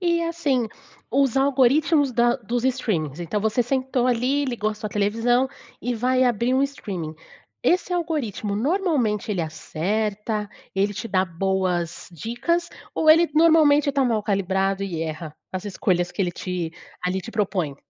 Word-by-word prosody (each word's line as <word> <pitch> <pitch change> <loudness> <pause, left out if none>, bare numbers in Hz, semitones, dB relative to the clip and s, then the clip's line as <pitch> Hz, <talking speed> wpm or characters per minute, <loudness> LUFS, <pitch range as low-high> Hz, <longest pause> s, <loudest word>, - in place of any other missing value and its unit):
E 340 -2 +1
assim, 295 -9 0 0.4
os 270 0 +2
algoritmos 275 +1 +3
da 240 +1 +3
dos 240 0 -3
streamings, 185 - -1
então 175 +5 -2
você 220 +3 +1
sentou 260 0 0
ali, 255 +4 +1
ligou 230 -5 -1
a 215 - -5
sua 215 0 -5
televisão, 230 +6 +1 0.3
e 245 0 -1
vai 255 +3 +2
abrir 240 +1 +1
um 265 - +3
streaming. 190 - -4 0.5
Esse 360 0 +2
algoritmo, 295 - -2
normalmente, 255 - 0
ele 185 - -1
acerta, 210 +6 -2 0.3
ele 200 +2 +1
te 230 - -5
dá 190 -2 +2
boas 180 -1 -1
dicas, 245 - -1 0.3
ou 310 - +5
ele, 330 +2 +6
normalmente, 305 -3 +5
tá 275 -1 +1
mal 225 -4 +1
calibrado 195 -1 0
e 170 -4 -3
erra, 155 -1 -5 0.2
as 185 +1 -4
escolhas 180 -3 0
que 200 - -1
ele 180 - 0
te, 175 -2 -4 0.3
ali, 185 +1 0
te 230 - -8
propõe? 190 -9 -1
225 Hz, 155 wpm, -23 LUFS, 190-270 Hz, 0.5 s, ele